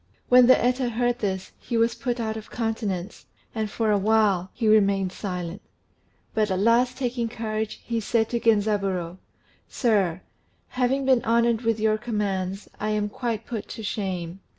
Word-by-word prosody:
] - - -39
When 250 -1 +7
the 255 - +7
Eta 250 +1 +1
heard 240 +1 0
this, 190 -3 -3
he 235 - -3
was 230 +1 +3
put 240 +1 -3
out 220 -1 -2
of 220 -1 -8
countenance, 215 -5 -3 0.3
and 220 -2 -2
for 220 +1 0
a 205 - +3
while 200 -3 +2
he 230 - -2
remained 200 -3 +3
silent; 180 -1 -5 0.7
but 215 -1 +1
at 190 - 0
last 235 +5 +3
taking 245 -3 -2
courage, 220 -2 -3
he 230 -1 -1
said 225 +1 +1
to 235 - -1
Genzaburô, 195 -6 +1 0.5
"Sir, 195 -8 +1 0.5
having 260 +2 0
been 260 -2 +3
honoured 235 0 +2
with 225 -2 0
your 215 0 +2
commands, 200 -4 -2
I 215 - -1
am 210 -1 0
quite 230 0 -3
put 225 -4 -5
to 220 - -8
shame. 190 -4 -3
220 Hz, 170 wpm, -25 LUFS, 200-235 Hz, 0.7 s, When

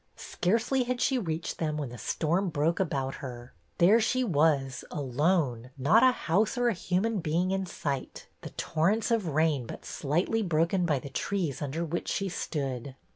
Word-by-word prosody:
Scarcely 230 +8 0
had 250 0 -2
she 260 0 +2
reached 165 -5 -3
them 155 -2 -1
when 145 -4 -3
the 125 - -9
storm 175 - 0
broke 160 +2 0
about 135 -7 -1
her. 125 -2 -8 0.2
There 205 +7 +6
she 255 +3 +1
was, 145 - +1
alone, 140 -3 0
not 155 - +5
a 260 - +7
house 210 0 0
or 245 0 +3
a - - +1
human 195 +4 0
being 170 +3 0
in 190 -1 -1
sight, 140 -6 -4 0.2
the - - -7
torrents 195 +9 0
of 220 -6 +1
rain 150 -5 +1
but - - -8
slightly 175 +10 0
broken 170 0 +1
by 150 -4 +2
the 140 +2 -7
trees 170 -2 -2
under 150 +4 -2
which 170 +2 -3
she 195 -1 -1
stood. 135 -6 -4
165 Hz, 175 wpm, -29 LUFS, 145-195 Hz, 0.2 s, a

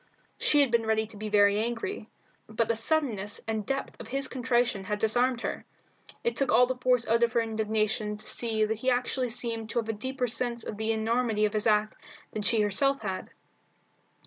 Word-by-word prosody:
She 295 - +4
had 275 -4 +3
been 230 -1 +2
ready 220 0 +2
to 220 0 -10
be 215 +1 -5
very 205 0 +4
angry, 240 - -4 0.4
but 220 +1 0
the 230 - +1
suddenness 225 -5 -1
and 220 -2 -2
depth 270 0 -3
of - - -8
his 275 +1 -2
contrition 245 -6 0
had 210 +2 -2
disarmed 240 +3 +2
her. - - -4 0.6
It 470 - 0
took 275 - +1
all 250 - +6
the 255 - -1
force 250 -1 +1
out 230 +1 +3
of 235 0 +2
her - - +3
indignation 215 -1 -1
to 215 - -7
see 220 -2 0
that 220 0 -2
he 255 - +1
actually 250 0 0
seemed 225 -1 -2
to - - -4
have 225 -1 -4
a - - +1
deeper 255 +4 -3
sense 235 0 -1
of 210 - -6
the 220 +1 0
enormity 225 0 +1
of 210 - -1
his 215 +1 0
act 215 0 +2 0.4
than 215 - -3
she 220 +1 +2
herself 270 +6 +1
had. 190 -2 -4
225 Hz, 205 wpm, -28 LUFS, 215-250 Hz, 0.6 s, all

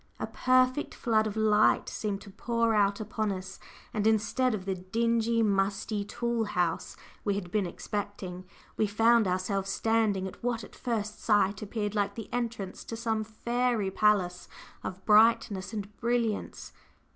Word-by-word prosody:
A - - -1
perfect 255 +2 +2
flood 220 -2 +2
of 215 0 -5
light 215 -1 +4
seemed 205 -2 -3
to 200 - -11
pour 230 +2 0
out 200 -1 +2
upon 215 0 -2
us, 190 0 -6 0.3
and 215 0 +1
instead 225 +3 +2
of 190 -3 -7
the 195 - 0
dingy, 230 +4 +1
musty 200 +1 0
tool 235 +2 -1
house 180 -5 -1 0.3
we 200 -2 0
had 180 -3 -5
been 205 -2 +1
expecting, 185 -1 -5 0.3
we 215 - +2
found 225 +1 +4
ourselves 190 +2 -1
standing 220 -3 +1
at - - -11
what 235 -2 -1
at - - -12
first 215 -4 -3
sight 205 -2 +2
appeared 210 0 -3
like 200 -1 0
the 225 - -8
entrance 230 -6 -3
to 230 - -6
some 225 -1 -1
fairy 235 -1 -1
palace 190 -4 +2 0.4
of 190 0 -6
brightness 215 -2 +4
and 210 -2 -6
brilliance. 235 -3 -1
215 Hz, 155 wpm, -29 LUFS, 195-230 Hz, 0.4 s, light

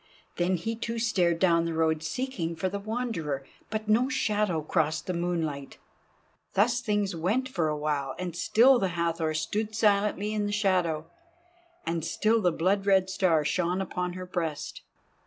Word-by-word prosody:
Then 175 +2 +2
he 225 +7 -3
too 230 +1 -4
stared 185 -7 +2
down 170 -2 +3
the 165 -1 -2
road 160 -1 +1
seeking 170 -2 -3
for 165 +4 -1
the 200 +2 -4
Wanderer, 200 - -3 0.2
but 215 0 -3
no 235 +5 +3
shadow 210 - 0
crossed 155 +1 0
the 185 - -2
moonlight. 165 -5 -2 0.8
Thus 235 +4 +3
things 205 -5 0
went 205 +11 0
for 175 -11 -1
awhile, 150 -2 -2
and 180 -2 -4
still 240 +8 +5
the 195 - +1
Hathor 165 -2 0
stood 210 +7 -2
silently 210 -1 +2
in 210 -1 0
the - - -2
shadow, 180 -6 +1 0.8
and 165 -1 -1
still 220 +7 +1
the 180 -3 +3
blood 195 +5 0
red 190 -1 +4
star 170 -5 +2
shone 180 +3 0
upon 180 -1 -3
her 185 0 -6
breast. 165 -4 -4
185 Hz, 160 wpm, -28 LUFS, 165-210 Hz, 0.8 s, still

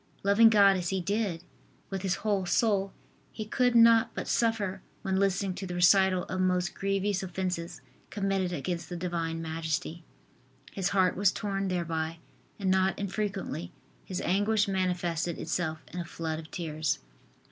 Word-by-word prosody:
Loving 200 +3 +6
God 200 -3 +6
as 175 -1 -2
he 190 - 0
did, 195 -2 -1 0.5
with 195 -1 -3
his 190 -1 0
whole 200 -4 +1
soul, 200 -2 +2 0.4
he 215 - -6
could 245 +2 +1
not 230 -1 +6
but - - -4
suffer 210 -5 0 0.2
when 190 -2 0
listening 195 -1 +1
to 190 +1 -6
the 180 - -5
recital 185 +1 +4
of 185 - -3
most 180 -1 +1
grievous 195 0 -1
offences 180 -2 -4 0.3
committed 195 -3 -1
against 170 +1 -3
the 175 - -4
Divine 165 -2 -3
Majesty. 160 +1 -3 0.7
His 195 -1 -1
heart 190 -2 +2
was 195 -1 +3
torn 195 -2 -2
thereby 165 -3 -2 0.4
and 190 -2 0
not 190 0 +2
infrequently 200 -4 -3 0.3
his 185 - -4
anguish 205 +3 +2
manifested 175 -3 -1
itself 160 -2 -2
in 180 - -4
a - - -2
flood 160 -1 -4
of 160 -1 -10
tears. 155 -4 -2
185 Hz, 155 wpm, -29 LUFS, 175-200 Hz, 0.7 s, Loving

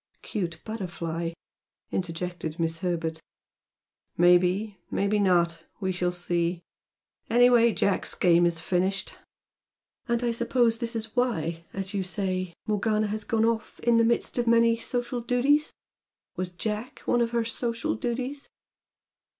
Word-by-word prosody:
"Cute 175 -6 -3
butterfly!" 170 -6 -4 0.6
interjected 175 -2 -3
Miss 165 0 -1
Herbert. 165 -3 -2 1.0
"Maybe. 180 +4 +3
Maybe 200 +1 +1
not. 170 -4 +2
We 190 -2 -1
shall 180 -1 0
see. 175 0 -1 0.7
Anyway 240 0 +6
Jack's 200 -2 0
game 175 -1 +4
is 170 -1 -1
finished." 190 +3 -1 0.9
"And 235 0 0
I 240 - +2
suppose 235 0 +2
this 235 -1 -1
is 225 0 -4
why, 170 -10 0
as 195 +1 -5
you 200 - 0
say, 185 -1 -2
Morgana 215 0 +1
has 215 +1 -2
gone 225 +1 +1
off 230 0 -1
'in 235 -1 +4
the 230 - +5
midst 235 +1 +1
of 240 - 0
many 230 0 +5
social 245 +1 -3
duties'? 265 +5 +2 0.6
Was 185 0 -2
Jack 210 +6 -4
one 240 - +2
of 235 - +2
her 235 -1 0
social 230 0 -1
duties?" 255 +5 -4
205 Hz, 135 wpm, -27 LUFS, 175-235 Hz, 1.0 s, Anyway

